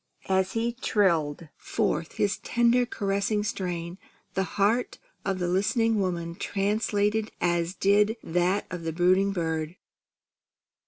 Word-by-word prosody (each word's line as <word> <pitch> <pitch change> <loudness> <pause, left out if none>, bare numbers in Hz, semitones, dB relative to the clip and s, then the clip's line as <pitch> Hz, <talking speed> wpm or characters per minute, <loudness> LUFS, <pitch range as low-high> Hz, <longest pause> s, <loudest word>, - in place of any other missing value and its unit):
As 190 0 +2
he 230 +1 0
trilled 170 - +1
forth 200 -6 -1
his 205 0 0
tender 240 +1 +2
caressing 200 -1 -1
strain, 180 -3 -4 0.3
the 190 - 0 0.2
heart 215 +5 +2 0.3
of 195 -1 -1
the 180 -1 -1
listening 215 +4 +2
woman 170 -3 -2
translated 210 +3 0
as 175 +1 0
did 210 +3 +3
that 180 +4 +1
of 180 - -4
the 165 -1 -3
brooding 185 +3 +3
bird. 160 -2 -2
195 Hz, 120 wpm, -27 LUFS, 175-210 Hz, 0.3 s, did